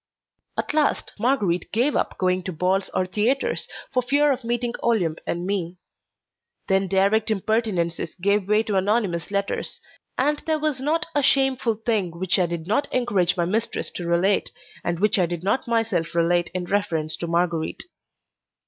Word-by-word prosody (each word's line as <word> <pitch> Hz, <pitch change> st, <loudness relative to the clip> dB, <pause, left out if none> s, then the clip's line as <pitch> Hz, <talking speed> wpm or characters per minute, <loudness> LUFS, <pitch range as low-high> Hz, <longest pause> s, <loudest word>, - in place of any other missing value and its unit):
At -, -, -2 dB
last 300 Hz, -2 st, +1 dB
Marguerite 205 Hz, -8 st, +1 dB
gave 245 Hz, +7 st, +1 dB
up -, -, -1 dB
going 185 Hz, 0 st, +1 dB
to 185 Hz, -, -2 dB
balls 185 Hz, +4 st, 0 dB
or 185 Hz, -, 0 dB
theatres, 220 Hz, +9 st, 0 dB, 0.3 s
for 255 Hz, -, +3 dB
fear 285 Hz, +4 st, +3 dB
of 260 Hz, -2 st, -2 dB
meeting 240 Hz, 0 st, -1 dB
Olympe 180 Hz, -9 st, +1 dB
and 175 Hz, +1 st, -2 dB
me. 185 Hz, -3 st, -2 dB, 0.9 s
Then 195 Hz, 0 st, +2 dB
direct 200 Hz, +4 st, +2 dB
impertinences 195 Hz, -6 st, -1 dB
gave 200 Hz, +2 st, +1 dB
way 210 Hz, +1 st, +4 dB
to 210 Hz, -3 st, -1 dB
anonymous 190 Hz, -3 st, 0 dB
letters, 200 Hz, 0 st, -2 dB, 0.4 s
and 295 Hz, 0 st, +1 dB
there 315 Hz, -1 st, +2 dB
was 305 Hz, -3 st, -1 dB
not 310 Hz, +4 st, 0 dB
a 290 Hz, -, +2 dB
shameful 265 Hz, -4 st, +2 dB
thing 220 Hz, -4 st, 0 dB
which 185 Hz, +1 st, +2 dB
I 180 Hz, -, +3 dB
did 170 Hz, -1 st, -4 dB
not 220 Hz, +10 st, 0 dB
encourage 200 Hz, -8 st, +1 dB
my 170 Hz, -, +2 dB
mistress 215 Hz, +6 st, -2 dB
to 175 Hz, -, -5 dB
relate 175 Hz, +4 st, +2 dB, 0.3 s
and 170 Hz, -1 st, -1 dB
which 210 Hz, +2 st, +3 dB
I 180 Hz, -, +3 dB
did 175 Hz, 0 st, -5 dB
not 205 Hz, +7 st, 0 dB
myself 225 Hz, -9 st, 0 dB
relate 170 Hz, 0 st, +2 dB
in 180 Hz, -1 st, -2 dB
reference 170 Hz, -6 st, -1 dB
to 170 Hz, -, -4 dB
Marguerite. 170 Hz, -1 st, -1 dB
200 Hz, 165 wpm, -24 LUFS, 175-235 Hz, 0.9 s, way